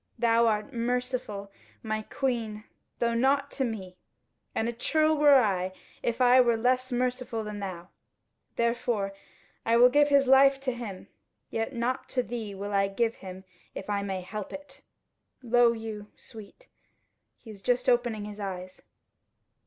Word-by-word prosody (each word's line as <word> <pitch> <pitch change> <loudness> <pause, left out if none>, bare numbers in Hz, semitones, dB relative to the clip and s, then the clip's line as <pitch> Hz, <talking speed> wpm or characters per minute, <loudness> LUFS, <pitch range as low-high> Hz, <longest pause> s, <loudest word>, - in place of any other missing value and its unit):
Thou 230 0 +3
art 215 +5 -1
merciful, 240 -4 -2 0.3
my 215 -1 -2
Queen, 225 -3 -3 0.3
though 235 0 +1
not 275 +4 +2
to 270 - -1
me, 190 -7 -5 0.6
and 225 - 0
a 235 - -2
churl 310 +6 +2
were 290 -2 +6
I 190 -5 0 0.3
if 235 0 -2
I 250 0 +6
were 235 -2 +3
less 255 +2 +1
merciful 250 -2 -1
than 210 -1 -6
thou. 180 -3 -6 0.7
Therefore 235 -4 0 0.5
will 235 +2 +5
I - - +7
give 290 +3 +4
his 280 -1 +4
life 270 +1 +6
to 260 -2 -1
him, 220 -6 -7 0.4
yet 225 +4 -2
not 245 +2 -2
to 250 - +3
thee 220 -3 -5
will 200 +1 -5
I 195 0 +3
give 225 +3 -1
him 185 0 -9 0.3
if 200 - -5
I 200 -1 0
may 190 -2 -3
help 210 +3 -6
it 285 -1 -10 0.6
Lo 240 0 +4
you, 220 -2 -6
Sweet! 225 - -13 0.7
he 225 - -12
is 200 -2 -12
just 245 +3 0
opening 240 -4 +1
his 210 0 -8
eyes." 185 -2 -6
230 Hz, 155 wpm, -28 LUFS, 205-250 Hz, 0.7 s, I